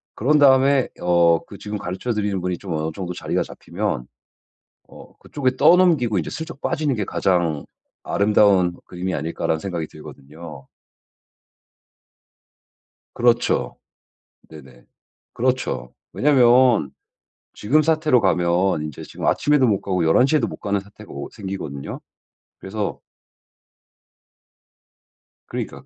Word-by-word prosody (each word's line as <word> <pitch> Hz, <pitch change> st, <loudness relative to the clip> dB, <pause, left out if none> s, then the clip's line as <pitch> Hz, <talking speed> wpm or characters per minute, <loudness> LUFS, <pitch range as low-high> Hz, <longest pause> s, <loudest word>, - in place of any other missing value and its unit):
그런 150 Hz, +7 st, +2 dB
다음에 135 Hz, -1 st, +4 dB
어 85 Hz, -1 st, +3 dB
그 100 Hz, -, -11 dB
지금 105 Hz, +1 st, -5 dB
가르쳐 95 Hz, +6 st, -4 dB
드리는 105 Hz, -3 st, -1 dB
분이 90 Hz, 0 st, -2 dB
좀 95 Hz, -2 st, -6 dB
어느 80 Hz, 0 st, -2 dB
정도 90 Hz, 0 st, -5 dB
자리가 -, -, -2 dB
잡히면 85 Hz, -9 st, -4 dB, 0.8 s
어 -, -, -15 dB
'그쪽에 130 Hz, -3 st, -2 dB
떠넘기고 160 Hz, -, +4 dB
인제 80 Hz, -, -3 dB
슬쩍 160 Hz, -1 st, -7 dB
빠지는 155 Hz, -5 st, -1 dB
게 105 Hz, -4 st, -2 dB
가장 85 Hz, -7 st, 0 dB, 0.4 s
아름다운 100 Hz, -3 st, +3 dB
그림이 90 Hz, +1 st, -4 dB
아닐까?'라는 80 Hz, +1 st, -2 dB
생각이 85 Hz, -3 st, -4 dB
들거든요. 75 Hz, 0 st, -12 dB, 2.5 s
그렇죠. 120 Hz, 0 st, +1 dB, 0.7 s
네네. 65 Hz, -6 st, -15 dB, 0.5 s
그렇죠. 125 Hz, -, -2 dB, 0.2 s
왜냐면 125 Hz, -, +4 dB, 0.6 s
지금 150 Hz, +9 st, +2 dB
사태로 155 Hz, -4 st, +3 dB
가면 90 Hz, -3 st, +1 dB
인제 75 Hz, -1 st, -7 dB
지금 -, -, -6 dB
아침에도 145 Hz, -3 st, +3 dB
못 100 Hz, -4 st, +2 dB
가고 90 Hz, -3 st, -1 dB
11:00 125 Hz, -, +4 dB
에도 120 Hz, -, 0 dB
못 -, -, -7 dB
가는 100 Hz, 0 st, -1 dB
사태가 100 Hz, +2 st, -14 dB
오 70 Hz, 0 st, -7 dB
생기거든요. 95 Hz, -10 st, -6 dB, 0.6 s
그래서 100 Hz, +1 st, -4 dB, 2.5 s
그러니까. -, -, -6 dB
100 Hz, 265 characters per minute, -21 LUFS, 85-130 Hz, 2.5 s, 다음에